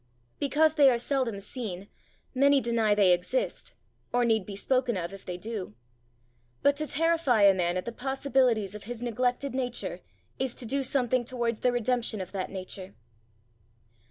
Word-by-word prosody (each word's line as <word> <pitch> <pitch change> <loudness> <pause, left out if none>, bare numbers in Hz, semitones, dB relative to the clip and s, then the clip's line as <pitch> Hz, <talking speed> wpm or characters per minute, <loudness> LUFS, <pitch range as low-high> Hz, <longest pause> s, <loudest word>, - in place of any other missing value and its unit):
Because 300 +3 +3
they 290 -4 +6
are 245 - +2
seldom 245 -4 -1
seen, 200 -3 -6 0.5
many 280 +1 +5
deny 230 -4 +2
they 200 -3 +5
exist, 340 - -1 0.4
or 245 0 +2
need 220 -5 +1
be 200 - -6
spoken 250 +1 0
of 175 +1 -4
if 195 - -12
they 180 -1 -4
do. 200 - -6 0.9
But 285 0 +4
to 305 +1 -2
terrify 320 -8 +2
a 200 -1 +8
man 175 -1 0
at 180 - -3
the 235 - -3
possibilities 255 -5 0
of 210 -1 -9
his 240 +1 -6
neglected 250 +3 -1
nature, 250 -2 -3 0.4
is 260 -2 -2
to 245 - -5
do 275 +4 0
something 255 -2 +1
towards 235 -2 -2
the 250 - +2
redemption 240 -2 0
of 185 -1 -6
that 190 -2 -3
nature. 190 0 -7
240 Hz, 165 wpm, -28 LUFS, 200-265 Hz, 0.9 s, a